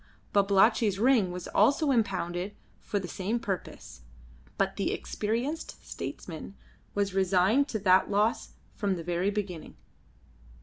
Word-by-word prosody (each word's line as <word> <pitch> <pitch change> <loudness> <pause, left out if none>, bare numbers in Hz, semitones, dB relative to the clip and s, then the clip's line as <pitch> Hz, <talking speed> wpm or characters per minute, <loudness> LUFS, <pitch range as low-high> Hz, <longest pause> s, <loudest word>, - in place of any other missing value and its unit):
Babalatchi's 200 +1 +4
ring 230 -3 +4
was 180 0 -6
also 280 +7 +3
impounded 190 -4 -1 0.2
for 205 - -3
the 190 -2 -3
same 200 +7 -2
purpose, 185 - -6 0.6
but - - 0
the - - -1
experienced 240 +9 -3
statesman 170 +3 -7 0.4
was 200 -1 0
resigned 195 +8 +3
to 220 - -2
that 190 -2 +4
loss 210 +3 +1 0.2
from 200 -3 -1
the 170 - -6
very 175 +3 0
beginning. 200 -5 -4
200 Hz, 125 wpm, -29 LUFS, 185-220 Hz, 0.6 s, Babalatchi's